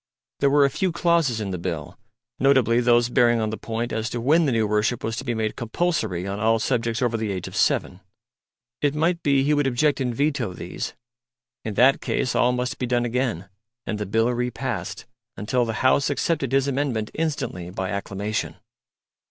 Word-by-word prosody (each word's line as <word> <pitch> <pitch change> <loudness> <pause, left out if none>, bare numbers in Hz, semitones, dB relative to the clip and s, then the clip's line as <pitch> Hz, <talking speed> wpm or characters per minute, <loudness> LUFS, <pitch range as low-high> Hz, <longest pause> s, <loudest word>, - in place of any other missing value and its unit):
There 140 - +3
were 140 0 +5
a - - +3
few 190 +4 0
clauses 165 -8 +2
in 100 -3 -3
the 90 - -4
Bill 85 -4 -4 0.4
notably 130 -4 +4
those 120 0 +4
bearing 120 -1 +3
on 110 -1 -1
the - - -2
point 115 +2 -4
as 110 +1 -2
to 120 - -4
when 155 +7 +3
the - - +2
new 115 -2 +2
worship 105 +3 0
was 115 0 -2
to - - -4
be 120 -3 -2
made 110 -1 -2
compulsory 115 - -1
on 100 +1 -4
all 115 +1 +3
subjects 115 0 -1
over 120 -2 +1
the 110 -2 -2
age 95 -2 -4
of - - -9
seven 90 - +1 0.8
it 145 0 +1
might 170 +3 +1
be 140 -2 +3
he 145 +2 +2
would 145 -2 +2
object 135 +3 +1
and 125 -2 -1
veto 140 -7 0
these. - - -6 0.7
In 110 -2 -4
that 130 +5 +5
case 125 - -1
all 125 - +3
must 125 0 -2
be 125 - -1
done 120 0 +1
again, 120 -7 -1 0.4
and 105 - -3
the 105 - -3
Bill 115 +4 +2
re 125 +1 -1
passed, 120 -5 -4 0.3
unless 120 +3 0
the 115 - -2
House 135 +2 +4
accepted 140 -2 -1
his 135 0 +2
amendment 130 -6 -1
instantly 145 - -3
by 95 0 -4
acclamation. 100 +2 -3
120 Hz, 200 wpm, -24 LUFS, 110-135 Hz, 0.8 s, were